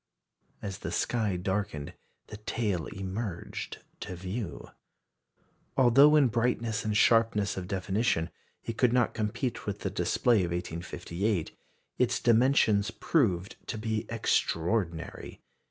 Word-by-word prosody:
As 100 Hz, -1 st, -5 dB
the -, -, -5 dB
sky 110 Hz, -6 st, 0 dB
darkened 95 Hz, -5 st, -2 dB, 0.3 s
the 105 Hz, -, -9 dB
tail 105 Hz, -6 st, -2 dB
emerged 95 Hz, -1 st, -5 dB, 0.2 s
to 90 Hz, -, -6 dB
view. 95 Hz, +3 st, -5 dB, 1.1 s
Although 135 Hz, +4 st, +7 dB
in 145 Hz, -3 st, +6 dB
brightness 115 Hz, -1 st, 0 dB
and 105 Hz, -1 st, 0 dB
sharpness 115 Hz, -2 st, +3 dB
of 90 Hz, -1 st, -5 dB
definition 95 Hz, -3 st, 0 dB, 0.3 s
it 115 Hz, -1 st, -5 dB
could 125 Hz, -2 st, +4 dB
not 125 Hz, -2 st, +2 dB
compete 110 Hz, +3 st, -2 dB
with 100 Hz, 0 st, -3 dB
the 95 Hz, -, -2 dB
display 100 Hz, +6 st, +2 dB
of 90 Hz, -4 st, +1 dB
1858, 85 Hz, +2 st, -3 dB, 0.4 s
its -, -, +2 dB
dimensions 115 Hz, -3 st, +4 dB
proved 105 Hz, -, 0 dB
to 115 Hz, -, -3 dB
be 110 Hz, 0 st, -2 dB
extraordinary. 85 Hz, -5 st, -1 dB
105 Hz, 120 wpm, -29 LUFS, 90-115 Hz, 1.1 s, Although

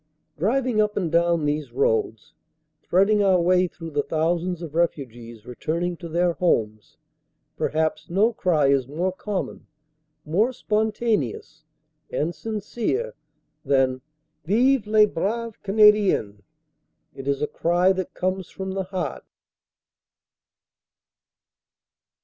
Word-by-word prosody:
Driving 230 Hz, -, +1 dB
up 210 Hz, 0 st, -1 dB
and 175 Hz, -5 st, -1 dB
down 170 Hz, -2 st, +2 dB
these 145 Hz, -3 st, -2 dB
roads, 110 Hz, -3 st, -1 dB, 0.5 s
threading 200 Hz, +4 st, +3 dB
our 190 Hz, -2 st, +4 dB
way 180 Hz, +1 st, +3 dB
through 165 Hz, -1 st, -9 dB
the 145 Hz, -1 st, +1 dB
thousands 170 Hz, +3 st, -1 dB
of 155 Hz, -3 st, -7 dB
refugees 120 Hz, -9 st, -3 dB
returning 170 Hz, +8 st, -3 dB
to 170 Hz, -1 st, -8 dB
their 175 Hz, +1 st, +1 dB
homes, 110 Hz, -, -1 dB, 0.6 s
perhaps 155 Hz, 0 st, -1 dB
no 205 Hz, +7 st, +2 dB
cry 165 Hz, -8 st, +1 dB
is 135 Hz, -3 st, +2 dB
more 170 Hz, +7 st, -1 dB
common, 195 Hz, +1 st, -5 dB, 0.6 s
more 205 Hz, +11 st, +1 dB
spontaneous 215 Hz, -, -1 dB, 0.4 s
and 165 Hz, +3 st, -1 dB
sin 215 Hz, +1 st, -5 dB
cere, 320 Hz, -, -2 dB, 0.5 s
than 130 Hz, -2 st, +1 dB, 0.4 s
"Vive 235 Hz, +5 st, +2 dB
les 215 Hz, 0 st, +6 dB
braves 220 Hz, +4 st, -3 dB
Canadiens!" 205 Hz, -, +3 dB, 0.7 s
It 135 Hz, 0 st, -9 dB
is 140 Hz, -1 st, 0 dB
a -, -, +1 dB
cry 175 Hz, +3 st, +2 dB
that 185 Hz, -1 st, -5 dB
comes 185 Hz, 0 st, -2 dB
from 190 Hz, -1 st, -6 dB
the 190 Hz, 0 st, -3 dB
heart. 185 Hz, -1 st, -4 dB
175 Hz, 115 wpm, -24 LUFS, 150-210 Hz, 0.7 s, les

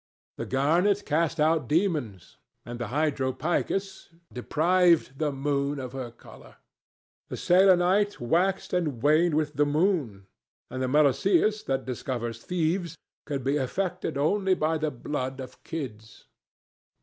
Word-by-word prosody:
The -, -, -5 dB
garnet 175 Hz, +10 st, +2 dB
cast 165 Hz, +1 st, 0 dB
out 155 Hz, -3 st, +2 dB
demons, 150 Hz, -, -1 dB, 0.3 s
and 120 Hz, +1 st, -7 dB
the 120 Hz, -, -3 dB
hydropicus 155 Hz, -, -2 dB, 0.2 s
deprived 165 Hz, +1 st, +2 dB
the 155 Hz, -2 st, 0 dB
moon 140 Hz, +1 st, -1 dB
of 130 Hz, -2 st, -6 dB
her 130 Hz, -3 st, -5 dB
colour. 115 Hz, -, -16 dB, 0.7 s
The -, -, -5 dB
selenite 190 Hz, +2 st, +3 dB
waxed 180 Hz, +12 st, 0 dB
and 150 Hz, -10 st, -1 dB
waned 155 Hz, +2 st, +3 dB
with 150 Hz, -1 st, 0 dB
the 145 Hz, -, +4 dB
moon, 145 Hz, -, 0 dB, 0.5 s
and 130 Hz, -, -4 dB
the 130 Hz, -, 0 dB
meloceus, 155 Hz, -, +3 dB
that 135 Hz, -1 st, -1 dB
discovers 120 Hz, -2 st, -4 dB
thieves, 170 Hz, -1 st, -1 dB, 0.3 s
could 140 Hz, -3 st, -3 dB
be 140 Hz, +3 st, +1 dB
affected 170 Hz, +3 st, -2 dB
only 190 Hz, +6 st, +2 dB
by 160 Hz, 0 st, 0 dB
the 155 Hz, 0 st, 0 dB
blood 130 Hz, 0 st, -4 dB
of 130 Hz, -, -10 dB
kids. 110 Hz, -9 st, -7 dB
150 Hz, 130 wpm, -27 LUFS, 130-175 Hz, 0.7 s, the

